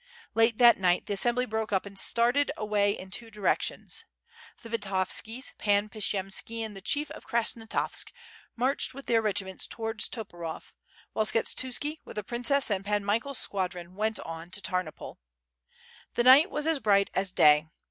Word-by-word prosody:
Late 225 0 +3
that 240 -4 +7
night 180 -1 +2
the - - -2
assembly 240 +5 +1
broke 220 -2 -3
up 190 -1 +1
and 200 0 -10
started 245 +5 +2
away 205 -1 +1
in 190 0 -10
two 230 +4 -1
djrcK?tions. 210 -3 -1 0.6
The 230 - -9
Vitovskia, 220 +3 -1
Pan 205 0 +2
Pshiyemski 205 +2 -2
and 215 -2 -8
the 195 - -9
Chief 295 +9 -1
of - - -10
Krasnostavsk, 230 -1 -1 0.4
marched 255 +2 0
with 275 - -8
their 230 -1 +3
regiments 200 -3 -2
towards 225 -1 -3
Toporov, 175 -8 -7 0.4
while 215 -1 +1
Skshetuski, 260 +7 -1
with - - -11
the 210 - -3
princess 245 +4 +1
and 195 -1 0
Pan 205 0 -1
Michael's 230 +6 0
squadron, 180 -2 -3
went 215 +2 -1
on 165 +1 -7
to 190 +3 -2
Tamopol. 185 -4 -4 1.0
The 240 - +2
night 270 +8 +8
wa:« 300 - -2
as 320 -2 +2
bright 200 -4 +3
as 190 0 0
day. 150 -2 +5
215 Hz, 160 wpm, -28 LUFS, 195-235 Hz, 1.0 s, night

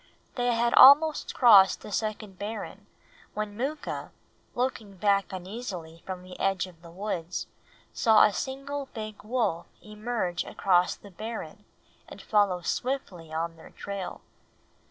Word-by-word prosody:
They 245 -1 +1
had 235 +1 +1
almost 300 +3 +7
crossed 205 -6 +7
the - - -9
second 215 -2 -3
barren 210 +1 -6 0.5
when 210 -1 -3
Mooka, 285 +6 -4 0.5
looking 225 -6 -3
back 200 0 +2
uneasily 185 -4 -7
from 185 -1 -5
the 185 0 -11
edge 195 -2 +1
of 175 -3 -16
the 170 - -13
woods, 180 -2 -4 0.5
saw 220 -2 +5
a 210 - +4
single 275 +3 -4
big 215 -1 -6
wolf 215 -7 -1
emerge 210 -4 -3
across 180 -2 +2
the 200 - -15
barren 220 +5 -7 0.4
and - - -11
follow 200 -4 +2
swiftly 180 - -3
on 165 +1 -3
their 160 - -14
trail. 200 -2 -6
205 Hz, 135 wpm, -28 LUFS, 185-235 Hz, 0.5 s, almost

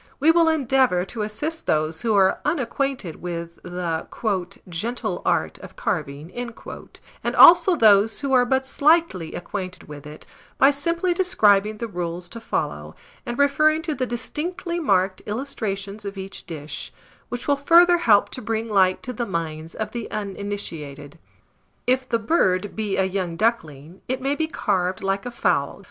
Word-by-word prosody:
We 305 +4 +5
will 330 -1 +4
endeavour 265 - +2
to 220 +3 -6
assist 295 +11 -4
those 155 +1 0
who 225 -2 +1
are 190 -1 +4
unacquainted 270 - -2
with 170 -1 -6
the 175 -2 -4 0.6
"gentle 215 +8 -3
art - - 0
of - - -12
carving," 155 - -3 0.9
and - - -1
also 350 +2 +8
those 215 -3 +4
who 275 -2 -1
are 250 -1 +6
but 265 +2 +1
slightly 285 - +2
acquainted 185 0 -6
with 150 -1 -10
it, 150 +1 -11 0.3
by 270 +2 +6
simply 335 +5 0
describing 215 - +3
the 230 - -4
rules 175 -2 -5
to 230 - -8
follow, - - -3 0.3
and 240 0 -3
referring 305 +3 +3
to 320 - -2
the 255 -3 -2
distinctly 340 +8 -4
marked 190 - +1
Illustrations 210 -4 -4
of 200 0 -6
each 195 0 -8
dish, 155 -2 -6 0.4
which 245 0 -6
will 285 - +4
further 340 +5 +5
help 215 -11 +4
to 255 - -7
bring 225 0 -2
light 190 -3 +2
to 250 - -5
the 235 0 -3
minds 160 -2 -4
of 215 -1 -4
the 235 -1 -5
uninitiated. 175 -8 -6 0.7
If 255 +1 +1
the 230 - +2
bird 205 - +1
be 210 -3 -2
a 190 - +3
young 185 -3 -2
duckling, 165 - -2
it 255 +1 -2
may 270 +2 0
be 315 +2 -1
carved 185 - -1
like 195 +3 -1
a - - -2
fowl, 175 -11 0
viz. - - -18
215 Hz, 160 wpm, -23 LUFS, 180-275 Hz, 0.9 s, also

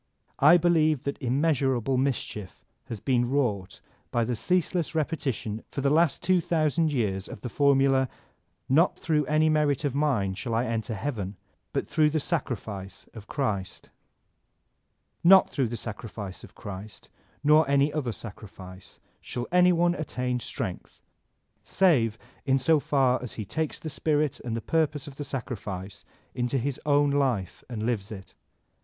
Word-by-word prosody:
I 155 +5 +8
believe 155 -4 +2
that 140 - -4
immeasurable 135 -1 +1
mischief 125 -7 -3 0.2
has 115 - -6
been 120 +1 +1
wrought 105 -9 -1 0.3
by 120 - +1
the 120 +1 -1
ceaseless 180 - 0
repetition 135 -9 -2
for 140 - -4
the 140 +1 +2
last 160 -1 +2
two 185 -1 +3
thousand 160 -1 +1
years 100 -8 -1
of - - -9
the 125 - -5
formula: 135 -1 +3 0.6
"Not 160 +7 +4
throtigh 150 -3 0
any 155 +1 +3
merit 150 -2 +2
of 140 - 0
mine 135 -10 +1
shall 115 +4 -3
I 120 +2 +1
enter 115 -1 -2
heaven, 105 -4 -4 0.4
but - - -1
throtigh 150 -1 +2
die - - +2
sacrifice 110 - -4
of 110 -2 -11
Christ" 105 -10 -3 0.7
— - - -48
Not 190 - +6
through 135 -4 0
the 120 +1 -4
sacrifice 105 -3 -7
of - - -14
Christ, 100 +1 -9 0.4
nor 150 0 +5
any 140 +1 +3
other 140 -6 -1
sacrifice, 95 -4 -10 0.2
shall 120 -1 -4
any 180 0 +5
one 175 0 +3
attain 125 -6 -2
strength, - - -6 0.6
save 125 - +2 0.3
in 135 -1 +2
so 150 +4 +3
far 135 -3 +2
as 125 - -6
he 110 - -5
takes 155 +9 -2
the - - -8
spirit 150 -1 0
and 115 -2 -4
the - - -4
purpose 155 -2 0
of 140 -1 -11
the 145 - -4
sacrifice 105 -8 -6 0.3
into 125 +1 -1
his 135 +1 -2
own 145 0 +4
life 130 -10 0
and 110 -3 -4
lives 110 -4 -2
it. 95 -3 -9
135 Hz, 155 wpm, -27 LUFS, 110-150 Hz, 0.7 s, I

